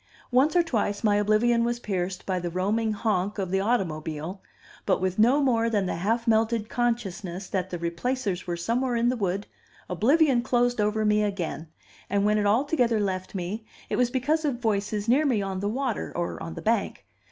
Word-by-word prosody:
Once 270 +7 +3
or 350 - +5
twice 215 -9 -1
my 205 -2 +3
oblivion 215 +3 +3
was 240 0 0
pierced 185 -4 -3
by 185 -1 -1
the 175 0 -3
roaming 205 +6 0
honk 205 -2 -1
of 190 -3 -3
the 190 - +2
automobile; 170 -5 -2 0.5
but - - +3
with 185 +1 -1
no 255 +7 +5
more 230 -3 +2
than 205 -4 +1
the 180 - -2
half 225 +7 0
melted 225 0 +2
consciousness 200 -6 -2
that 190 -1 -2
the 175 - -4
Replacers 180 +3 -2
were 175 -1 -2
somewhere 240 +8 0
in 235 +1 +2
the 250 - 0
wood, 200 -2 -1 0.4
oblivion 260 - +3
closed 245 -2 +1
over 215 +1 +1
me 210 0 +3
again; 180 -6 -3 0.4
and 200 +1 +1
when 210 0 +3
it 205 - +1
altogether 240 0 +2
left 190 -2 -2
me, 190 +5 -4 0.3
it - - +1
was 250 -1 +2
because 290 +6 0
of 280 -5 0
voices 210 -2 -1
near 265 +6 +4
me 260 -8 +2
on 195 -1 -3
the 200 +1 -1
water, 255 0 -2
or 175 0 -3
on 165 - -6
the - - -7
bank. 215 - 0
210 Hz, 195 wpm, -26 LUFS, 190-240 Hz, 0.5 s, or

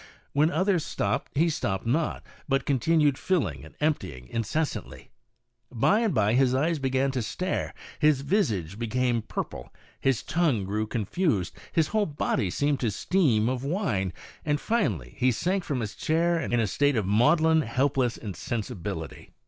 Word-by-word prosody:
"When 150 +3 +4
others 180 0 +1
stopped - - -2
he 165 +3 +4
stopped 95 - -2
not, 150 +7 0 0.3
but 135 -1 +1
continued 145 +1 +2
filling 185 -3 0
and - - -13
emptying 75 - -1
incessantly. 115 - -3 0.6
By 130 - +3
and 230 -3 +1
by 110 - +2
his 130 0 +3
eyes 155 +4 +1
began 135 0 +1
to 130 -2 -1
stare, 180 - -2 0.3
his 150 -3 +4
visage 110 - 0
became 120 0 0
purple, - - -6 0.3
his 135 -4 +1
tongue 145 - +1
grew 105 +3 -1
con 110 -2 -2
fused, 115 - 0 0.2
his 160 -2 +2
whole 215 -1 +1
body 145 - -1
seemed 145 +8 0
to 120 - +1
steam 120 - +2
of 130 0 -1
wine, 140 - -1 0.3
and 150 -1 0
finally 105 - -1
he 130 +1 +4
sank 180 - 0
from 140 -7 -2
his 105 -1 -4
chair 170 +2 +1
in - - -3
a 115 -2 +3
state 145 +8 +2
of 110 -4 +1
maudlin, 155 - +4
helpless 130 -1 0
insensibility. 100 - -5
130 Hz, 155 wpm, -27 LUFS, 110-160 Hz, 0.6 s, When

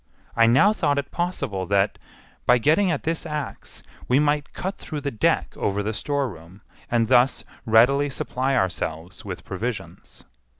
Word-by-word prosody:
I 115 0 +5
now 135 - +5
thought 145 -8 0
it 140 - -3
possible 140 - -2
that, 100 0 +1 0.5
by 125 - +6
getting 160 - +3
at 155 -5 -1
this 165 0 -1
axe, 150 -3 -6 0.2
we 125 - +3
might 150 0 +1
cut 190 +2 -5
through 150 -3 -6
the 140 0 -3
deck 110 - 0
over 100 0 -1
the 110 +2 -2
storeroom, 105 - -4 0.3
and 115 -1 +2
thus 125 +2 +3 0.2
readily 130 +6 +4
supply 130 0 -2
ourselves 85 0 -2
with 95 -3 -7
provisions. 95 -4 -6
125 Hz, 155 wpm, -24 LUFS, 100-145 Hz, 0.5 s, by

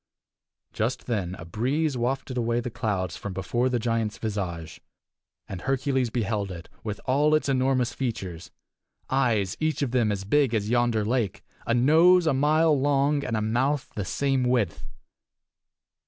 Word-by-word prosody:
Just 115 +3 -2
then 95 -7 -2
a 85 - -10
breeze 135 - -1
wafted 130 +2 -2
away 120 -1 0
the 120 0 -4
clouds 100 -8 -2
from 100 - -6
before 120 +7 0
the 125 - 0
giant's 115 -2 -1
visage, 90 -7 -4 0.7
and 95 -2 -6
Hercules 135 -1 0
beheld 105 -3 -1
it, 85 -2 -9
with 105 -2 -4
all 145 +4 +3
its 155 - 0
enormous 130 -2 +1
features 95 -10 -4 0.6
eyes 115 -8 +1
each 155 -2 0
of 130 - -1
them 120 -4 +2
as 100 -2 -3
big 130 +3 +2
as 105 0 -1
yonder 120 -3 +2
lake, 115 -4 -1 0.2
a 115 - +2
nose 165 +8 +5
a 155 - +3
mile 155 +4 +3
long, 140 +1 +2
and 115 -3 -2
a - - -1
mouth 130 +6 0
the 100 - -3
same 135 +6 0
width. 120 -9 0
120 Hz, 155 wpm, -26 LUFS, 105-135 Hz, 0.7 s, nose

